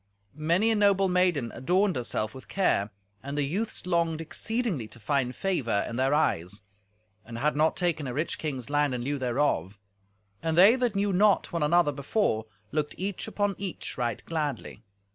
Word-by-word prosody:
Many 170 +9 +2
a - - +2
noble 200 -2 +4
maiden 180 -9 +1
adorned 185 +8 +1
herself 115 -3 -2
with 130 - -11
care, 110 - +1 0.3
and 140 +4 -5
the 145 - +2
youths 195 +9 -3
longed 170 -3 +1
exceedingly 185 - -2
to 115 - -13
find 125 +2 0
favour 140 - 0
in 115 - -5
their 130 +2 +1
eyes, 95 - 0 0.6
and 115 0 -8
had 150 +5 +1
not 155 +2 +2
taken 170 -6 0
a 125 - -4
rich 155 +3 -2
king's 140 -4 -4
land 145 -2 +2
in 120 - -3
lieu 145 +2 -2
thereof. 120 - 0 0.6
And 160 0 -1
they 200 +7 +8
that 245 -5 0
knew 200 0 +1
not 200 0 +3
one 170 - -1
another 160 +1 +3
before 140 - -1 0.2
looked 150 -1 -1
each 195 +2 -3
upon 205 -2 0
each 195 -2 -4
right 120 -4 -2
gladly. 145 -9 -3
155 Hz, 175 wpm, -28 LUFS, 130-185 Hz, 0.6 s, they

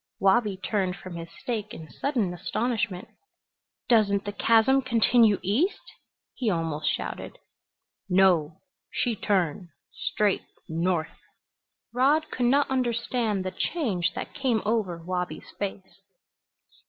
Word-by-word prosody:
Wabi 195 +1 +3
turned 190 -2 -1
from 185 -2 -9
his 165 0 -7
steak 215 +1 -5
in 160 - -9
sudden 235 - -1
astonishment. 215 +1 -2 0.8
"Doesn't 200 -4 +3
the 205 - -2
chasm 230 +6 +4
continue 230 -3 +4
east?" 255 - 0 0.4
he 245 -4 -1
almost 165 -4 -1
shouted. - - -4 0.7
"No. 180 -4 +3 0.3
She 240 -3 -1
turn 180 -4 0 0.2
straight 210 -2 0 0.3
north." 165 0 -1 0.7
Rod 290 +6 +3
could 245 -1 +1
not 280 +3 +4
understand 235 -5 0
the 185 - -2
change 200 - -1
that - - -5
came 260 -6 0
over 210 -6 0
Wabi's 180 0 -4
face. 195 -1 -5
205 Hz, 115 wpm, -27 LUFS, 180-240 Hz, 0.8 s, chasm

